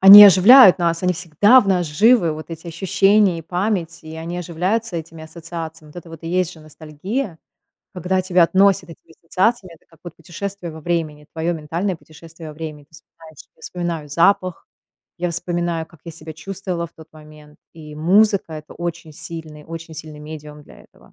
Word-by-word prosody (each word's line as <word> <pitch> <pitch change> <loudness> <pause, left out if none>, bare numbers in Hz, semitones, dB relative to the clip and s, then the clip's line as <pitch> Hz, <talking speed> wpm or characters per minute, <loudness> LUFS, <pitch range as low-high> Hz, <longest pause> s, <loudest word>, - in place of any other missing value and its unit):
они 200 +2 +12
оживляют 200 +3 +8
нас, 170 -1 0
они 180 0 +2
всегда 185 - +4
в 200 - -4
нас 180 -3 +1
живы, 180 +2 +3
вот 155 +1 -8
эти 165 +1 -9
ощущения 195 +2 +2
и - - -8
память, 175 -1 -3
и 160 0 -9
они 170 +2 -6
оживляются 180 +4 -2
этими 160 0 -8
ассоциациями. 160 -1 -8
Вот 165 - -17
это 170 -1 -10
вот 165 0 -11
и - - -5
есть 180 0 0
же 160 - -15
ностальгия, 160 - -6 0.6
когда 185 +1 -1
тебя 180 -2 +3
относят 190 -1 +2
этими 165 0 -16
ассоциациями. 185 +1 -1
Это - - -25
как 165 -1 -24
вот 175 -2 -10
путешествие 175 +1 -7
во 160 - -10
времени, 155 -3 -3
твое 165 +2 -2
ментальное 170 +4 -3
путешествие 160 +1 -13
во - - -12
времени. 150 -2 -8
Ты 150 - -42
вспоминаешь 160 -1 -17 0.2
Я - - -28
вспоминаю 170 -4 -5
запах, 185 +3 +1 0.5
я 175 0 -2
вспоминаю, 175 -1 -2
как 165 - -21
я 170 - -8
себя 160 0 -10
чувствовала 180 +1 -5
в 165 - -21
тот 160 -1 -16
момент, 150 -1 -16 0.2
и 150 -2 -11
музыка- 195 +3 +2
это 155 0 -10
очень 170 -2 -6
сильный, 155 -1 -9
очень 165 0 -9
сильный 155 -1 -9
медиум 150 -1 -10
для - - -17
этого. - - -23
170 Hz, 185 wpm, -20 LUFS, 160-185 Hz, 0.6 s, они